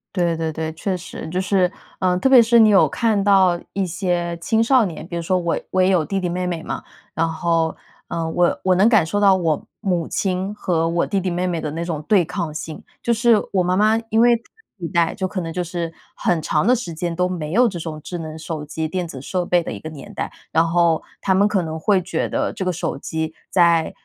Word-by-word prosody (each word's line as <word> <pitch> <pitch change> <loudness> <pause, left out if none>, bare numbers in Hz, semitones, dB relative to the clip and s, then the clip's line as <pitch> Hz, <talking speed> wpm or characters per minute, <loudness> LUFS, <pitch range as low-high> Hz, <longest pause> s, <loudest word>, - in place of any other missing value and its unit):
对 170 -3 +1
对 160 -1 -2
对， 160 0 -3
确 185 +3 -2
实， 180 0 -8
就 180 +3 -1
是， 185 -1 +2 0.3
呃， 185 -1 +1
特 265 - +2
别 265 -2 +8
是 235 +1 +4
你 220 - +7
有 200 -2 +5
看 220 -4 +1
到 190 -4 +4
一 195 - 0
些 175 -1 -2
青 220 +6 +1
少 250 -1 +4
年， 165 -3 -6
比 175 - -6
如 170 - -3
说 185 +2 +1
我 170 -1 -1
我 185 - +2
也 185 - +4
有 180 -5 +2
弟 195 +3 -2
弟 180 -2 -2
妹 180 +1 -2
妹 175 -2 -3
嘛， - - -5 0.3
然 165 - +1
后， 165 0 0 0.3
呃， 165 -1 -2
我 175 +1 +1
我 185 -1 +3
能 195 +5 +5
感 215 -6 +5
受 185 +6 -1
到 195 -2 +5
我 165 -5 -1 0.2
母 180 -6 0
亲 190 +1 -2
和 165 -5 0
我 170 +1 0
弟 200 - 0
弟 185 -1 -2
妹 180 +1 -1
妹 170 -2 -1
的 150 - -4
那 165 +2 -3
种 165 -3 -3
对 195 -5 +4
抗 165 -2 -4
性。 155 0 -7 0.2
就 235 - 0
是 235 0 +4 0.2
我 185 -2 +3
妈 180 +1 +1
妈 215 +3 +4
因 225 +1 +4
为 240 0 +6
上 230 - -9 0.3
一 170 -3 -5
代 170 -1 +1
就 190 - -2
可 185 0 -4
能 165 -1 -5
就 180 +2 -2
是 170 -1 -4 0.2
很 175 - 0
长 155 +5 +1
的 250 - +5
时 225 -9 -5
间 170 +1 -3
都 180 +1 +1
没 165 -4 -4
有 245 +4 +5
这 185 -6 -4
种 160 -2 -6
智 175 - -5
能 160 -1 -6
手 160 -1 -5
机、 160 +1 -4
电 180 +1 -3
子 140 -5 -8
设 180 +7 -2
备 175 0 +2
的 - - -5
一 - - -6
个 155 - -7
年 145 -4 -11
代， - - -4 0.2
然 160 - +4
后 170 -1 +2 0.2
他 190 - +2
们 200 +2 +4
可 195 -4 0
能 160 0 -5
会 195 +4 +3
觉 180 - -2
得 - - -1
这 - - -4
个 185 - 0
手 175 - -3
机 160 -1 -3 0.2
在 170 -3 +3
175 Hz, 270 characters per minute, -21 LUFS, 165-195 Hz, 0.3 s, 别